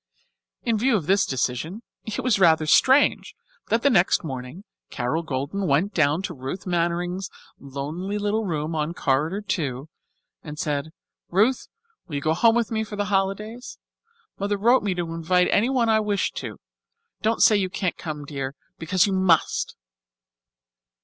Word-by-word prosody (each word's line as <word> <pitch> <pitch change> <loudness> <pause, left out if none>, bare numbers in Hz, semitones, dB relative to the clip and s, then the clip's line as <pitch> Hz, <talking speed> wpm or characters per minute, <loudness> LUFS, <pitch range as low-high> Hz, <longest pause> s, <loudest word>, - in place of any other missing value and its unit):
In 225 -2 +1
view 250 +1 +3
of 170 - -5
this 195 +4 +3
decision 135 - -2 0.2
it 220 - -4
was 240 -6 +2
rather 160 -4 +5
strange 265 - +4 0.3
that 230 +1 +1
the 280 - +5
next 185 -4 +3
morning, 130 +4 -7 0.3
Carol 125 +7 -1
Golden 155 +6 -3
went 165 +9 +1
down 155 +3 +2
to 180 - -4
Ruth 135 +6 -6
Mannering's 175 +1 -1 0.3
lonely 150 +9 -5
little 210 +2 0
room 160 -4 -2
on 155 +2 -2
Corridor 155 +9 0
Two 145 -8 -3 0.5
and 150 -1 -8
said, 150 0 -2 0.4
"Ruth, 215 +8 +2 0.4
will 155 - -6
you 140 - -2
go 155 +2 +1
home 225 +7 +4
with 235 -1 0
me 220 -1 0
for 215 -1 -7
the 205 0 -1
holidays? 210 +5 -2 0.6
Mother 205 +1 -1
wrote 240 +6 +4
me 200 -3 -1
to 170 -2 -3
invite 180 +2 +2
anyone 240 +2 +2
I 220 -1 +4
wished 205 -3 -1
to. - - -6 0.6
Don't 220 +1 +2
say 215 - +6
you 190 -2 +1
can't 185 -1 -2
come, 150 -3 -6
dear, 140 -1 -5 0.2
because 175 +3 +2
you 200 - -1
must." 185 -4 +2
180 Hz, 160 wpm, -24 LUFS, 155-205 Hz, 0.6 s, say